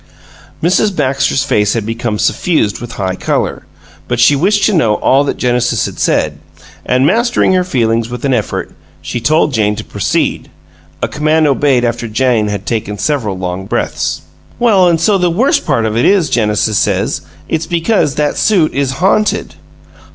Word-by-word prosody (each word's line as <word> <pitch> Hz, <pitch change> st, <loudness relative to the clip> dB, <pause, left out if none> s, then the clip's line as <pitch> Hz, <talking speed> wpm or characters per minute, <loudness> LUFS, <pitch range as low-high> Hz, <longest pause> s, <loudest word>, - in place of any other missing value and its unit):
Mrs. 190 Hz, +4 st, +2 dB
Baxter's 135 Hz, -1 st, 0 dB
face 105 Hz, -7 st, +1 dB
had 115 Hz, -3 st, -2 dB
become 115 Hz, -1 st, -3 dB
suffused 110 Hz, -, 0 dB
with 120 Hz, -1 st, -7 dB
high 95 Hz, -2 st, -2 dB
color, -, -, -2 dB, 0.4 s
but 120 Hz, -1 st, -2 dB
she 125 Hz, +4 st, +5 dB
wished 200 Hz, +8 st, +1 dB
to 215 Hz, -, +3 dB
know 115 Hz, -, +2 dB
all 135 Hz, +5 st, +2 dB
that -, -, -2 dB
Genesis 125 Hz, -1 st, 0 dB
had -, -, -7 dB
said, -, -, 0 dB, 0.4 s
and, 125 Hz, +2 st, +1 dB
mastering 235 Hz, -, +2 dB
her 185 Hz, -1 st, +2 dB
feelings 115 Hz, -8 st, 0 dB
with 125 Hz, +2 st, -5 dB
an 135 Hz, -, +1 dB
effort, 110 Hz, -4 st, -3 dB, 0.3 s
she 80 Hz, +10 st, -4 dB
told 150 Hz, +3 st, +2 dB
Jane 105 Hz, -2 st, +1 dB
to -, -, -6 dB
proceed -, -, -2 dB, 0.5 s
a -, -, +2 dB
command 155 Hz, +1 st, +1 dB
obeyed 135 Hz, -3 st, +2 dB
after 120 Hz, 0 st, -2 dB
Jane 115 Hz, -1 st, +1 dB
had 100 Hz, -2 st, -4 dB
taken 105 Hz, -3 st, -3 dB
several 110 Hz, -5 st, -1 dB
long 90 Hz, +1 st, -4 dB
breaths. -, -, -2 dB, 0.4 s
"Well, 200 Hz, -7 st, +4 dB
an' 170 Hz, -, +2 dB
so 195 Hz, +4 st, +2 dB
the 180 Hz, -1 st, +2 dB
worst 235 Hz, +12 st, +1 dB
part 125 Hz, -7 st, +1 dB
of 110 Hz, -1 st, -2 dB
it 120 Hz, -, +2 dB
is, 185 Hz, -8 st, +3 dB
Genesis 105 Hz, -3 st, +1 dB
says, -, -, 0 dB, 0.3 s
it's 160 Hz, 0 st, -2 dB
because 170 Hz, -3 st, 0 dB
that 150 Hz, -1 st, -1 dB
suit 185 Hz, -7 st, +2 dB
is 135 Hz, -1 st, -1 dB
haunted." 210 Hz, +2 st, +1 dB
135 Hz, 175 wpm, -14 LUFS, 115-165 Hz, 0.5 s, she